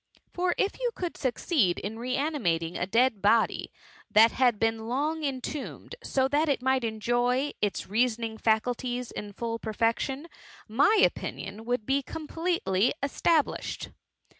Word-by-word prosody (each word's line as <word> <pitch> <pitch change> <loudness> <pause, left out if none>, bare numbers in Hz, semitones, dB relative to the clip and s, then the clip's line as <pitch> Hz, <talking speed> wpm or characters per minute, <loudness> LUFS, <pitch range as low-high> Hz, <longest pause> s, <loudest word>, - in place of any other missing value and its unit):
For 360 0 0
if 400 - 0
you - - +1
could 355 -2 -4
succeed 255 - +1
in 215 +3 -5
re 250 +2 -2
animar 275 - +1
tkskg 165 +1 -5
a 180 - 0
dead 230 0 +2
body 220 +3 +2 0.4
that 220 +1 +6
had 245 -4 +3
been 225 0 0
long 300 +6 -1
entombed, 275 - -4
so 265 - +1
that 295 +3 +2
it 280 - +2
might 260 -1 +2
enjoy 240 +5 0
its 205 -1 -1
reasoning 225 0 0
fscuHies 245 +2 0
in 205 -1 -6
full 230 +2 -3
perfection, 230 +6 -1 0.4
my 290 - +4
opinion 205 +3 -4
would 245 -2 -1
be 275 +3 +2
ocani^tely 305 - 0
estabUsbed.'' 300 +2 0
245 Hz, 140 wpm, -28 LUFS, 220-285 Hz, 0.4 s, that